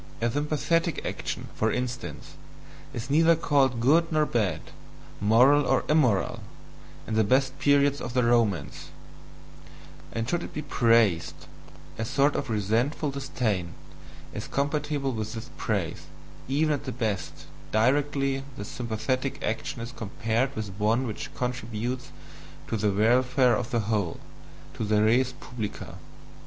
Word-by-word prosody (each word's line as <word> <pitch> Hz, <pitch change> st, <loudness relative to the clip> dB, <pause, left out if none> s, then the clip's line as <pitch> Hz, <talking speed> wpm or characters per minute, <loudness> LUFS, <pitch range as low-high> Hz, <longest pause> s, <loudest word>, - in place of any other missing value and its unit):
A 115 Hz, 0 st, +1 dB
sympathetic 155 Hz, +4 st, 0 dB
action, -, -, -4 dB
for 110 Hz, 0 st, +1 dB
instance, 125 Hz, 0 st, -4 dB, 0.6 s
is 120 Hz, +3 st, -5 dB
neither 165 Hz, +3 st, +5 dB
called 140 Hz, -6 st, +2 dB
good 160 Hz, +8 st, +3 dB
nor 155 Hz, -1 st, +3 dB
bad, 105 Hz, -, 0 dB, 0.6 s
moral 125 Hz, +8 st, +5 dB
nor -, -, +2 dB
immoral, 130 Hz, -11 st, +2 dB, 0.7 s
in 110 Hz, -, -4 dB
the 110 Hz, 0 st, +4 dB
best 130 Hz, +4 st, +1 dB
period 145 Hz, 0 st, +3 dB
of 120 Hz, +1 st, -5 dB
the 125 Hz, -, +3 dB
Romans; 110 Hz, -11 st, +1 dB, 1.2 s
and 115 Hz, 0 st, -3 dB
should 175 Hz, +6 st, 0 dB
it -, -, -8 dB
be 150 Hz, -, -3 dB
praised, 115 Hz, -, +2 dB, 0.5 s
a 110 Hz, -, -1 dB
sort 140 Hz, +5 st, +2 dB
of -, -, -2 dB
resentful 115 Hz, +8 st, 0 dB
disdain 125 Hz, -10 st, -2 dB, 0.6 s
is -, -, -5 dB
compatible 145 Hz, -1 st, -1 dB
with 110 Hz, -2 st, -4 dB
this 115 Hz, +2 st, -7 dB
praise, 85 Hz, -7 st, -2 dB, 0.4 s
even 150 Hz, +3 st, +2 dB
at 145 Hz, 0 st, -4 dB
the 130 Hz, -, -3 dB
best, 100 Hz, -10 st, -3 dB, 0.3 s
directly 135 Hz, +3 st, +1 dB
the 100 Hz, -, -5 dB
sympathetic 125 Hz, +4 st, -2 dB
action 120 Hz, +3 st, -3 dB
is 115 Hz, +1 st, -6 dB
compared 115 Hz, +3 st, -2 dB
with 105 Hz, -4 st, -4 dB
one 115 Hz, +5 st, +2 dB
which 110 Hz, -4 st, -5 dB
contributes 125 Hz, +1 st, -3 dB, 0.6 s
to -, -, -2 dB
the 105 Hz, -1 st, +1 dB
welfare 125 Hz, +5 st, +3 dB
of 115 Hz, +2 st, -3 dB
the 120 Hz, -4 st, +1 dB
whole, 105 Hz, -5 st, -1 dB, 0.5 s
to -, -, -4 dB
the 105 Hz, 0 st, +2 dB
RES 125 Hz, +4 st, +3 dB
PUBLICA. 115 Hz, -5 st, -7 dB
125 Hz, 135 wpm, -27 LUFS, 110-140 Hz, 1.2 s, neither